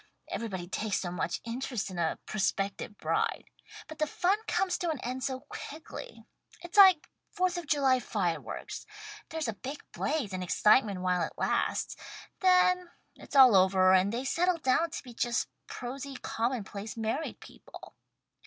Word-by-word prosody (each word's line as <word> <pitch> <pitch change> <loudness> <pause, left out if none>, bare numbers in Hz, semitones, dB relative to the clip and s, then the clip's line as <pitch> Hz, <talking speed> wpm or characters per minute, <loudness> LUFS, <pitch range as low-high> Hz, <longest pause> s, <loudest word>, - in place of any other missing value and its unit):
Everybody 190 -6 -4
takes 210 +2 -1
so 175 - -4
much 175 -1 -2
interest 235 -3 -3
in 180 - -5
a 165 -1 0
prospective 200 0 -2
bride. - - 0 0.4
But 315 - -10
the 305 - +2
fun 370 +7 +1
comes 380 -1 0
to 350 -3 -1
an 310 -4 -2
end 255 +1 -4
so 260 -1 -2
quickly. 315 - -9 0.4
It's 345 - -9
like 380 -6 +8 0.2
Fourth 365 0 0
of 350 -3 -5
July 270 -3 +3
fire 180 -9 -1
works. - - -7 0.4
There's 320 -4 -3
a 225 - -1
big 270 +7 -7
blaze 285 -10 -2
and 185 0 -3
excitement 205 +1 +3
while 180 -1 +1
it 165 - -2
lasts. - - 0 0.4
Then 365 -1 +4 0.3
it's - - -11
all 260 -5 +9
over 185 0 +5
and 190 +2 +4
they 245 +4 -3
settle 350 +5 +2
down 320 +3 +2
to 325 - -6
be 250 -3 -11
just 235 -1 0 0.2
prosy 270 +2 -6
common 235 0 -2
place 205 +3 -7
married 225 +8 -2
people. - - -13
255 Hz, 160 wpm, -30 LUFS, 200-315 Hz, 0.4 s, all